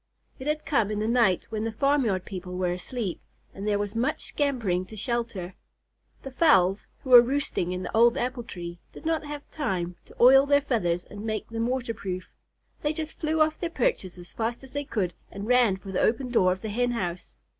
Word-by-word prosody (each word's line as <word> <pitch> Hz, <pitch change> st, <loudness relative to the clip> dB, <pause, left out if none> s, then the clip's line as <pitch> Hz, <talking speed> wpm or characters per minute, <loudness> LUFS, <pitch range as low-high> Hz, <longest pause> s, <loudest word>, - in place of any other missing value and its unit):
It 260 Hz, -, -6 dB
had 300 Hz, 0 st, -1 dB
come 230 Hz, -8 st, +2 dB
in 210 Hz, -, -2 dB
the 215 Hz, +1 st, -1 dB
night 230 Hz, -6 st, +3 dB
when 215 Hz, -1 st, -2 dB
the 225 Hz, -, -1 dB
farmyard 230 Hz, -6 st, +1 dB
people 180 Hz, -1 st, -6 dB
were 180 Hz, -1 st, 0 dB
asleep, 190 Hz, +2 st, -4 dB, 0.3 s
and 195 Hz, +2 st, -6 dB
there 205 Hz, -1 st, +2 dB
was 205 Hz, 0 st, -3 dB
much 250 Hz, +7 st, -1 dB
scampering 235 Hz, -11 st, 0 dB
to 220 Hz, -, -10 dB
shelter. 220 Hz, -5 st, -3 dB, 0.7 s
The 270 Hz, -, -7 dB
fowls, 210 Hz, -, +3 dB, 0.2 s
who 260 Hz, -, -5 dB
were 245 Hz, -1 st, +12 dB
roosting 250 Hz, -8 st, -1 dB
in 180 Hz, 0 st, -3 dB
the 180 Hz, -, -5 dB
old 235 Hz, +1 st, +5 dB
apple 250 Hz, 0 st, -2 dB
tree, 175 Hz, -6 st, -8 dB
did -, -, -12 dB
not 320 Hz, -1 st, 0 dB
have 295 Hz, 0 st, -7 dB
time 180 Hz, -, -2 dB
to -, -, -17 dB
oil 270 Hz, +3 st, +7 dB
their 285 Hz, 0 st, +5 dB
feathers 180 Hz, -11 st, 0 dB
and 205 Hz, 0 st, -10 dB
make 215 Hz, -1 st, -3 dB
them 230 Hz, 0 st, -1 dB
water 245 Hz, -2 st, -1 dB
proof. 185 Hz, -4 st, -5 dB, 0.5 s
They 295 Hz, +1 st, 0 dB
just 315 Hz, 0 st, -6 dB
flew 315 Hz, 0 st, 0 dB
off 310 Hz, 0 st, +2 dB
their 345 Hz, -, -2 dB
perches 330 Hz, -, -1 dB
as 175 Hz, 0 st, -12 dB
fast 235 Hz, +3 st, -3 dB
as 265 Hz, -, -12 dB
they 285 Hz, +1 st, -3 dB
could 185 Hz, -9 st, -1 dB, 0.2 s
and 200 Hz, +1 st, -7 dB
ran 240 Hz, -5 st, +4 dB
for 190 Hz, +1 st, -9 dB
the 185 Hz, -, 0 dB
open 245 Hz, +3 st, +1 dB
door 185 Hz, -6 st, +4 dB
of 185 Hz, +1 st, -3 dB
the 220 Hz, -, -3 dB
Hen 245 Hz, +3 st, 0 dB
house. 180 Hz, -6 st, -4 dB
230 Hz, 215 wpm, -27 LUFS, 185-265 Hz, 0.7 s, were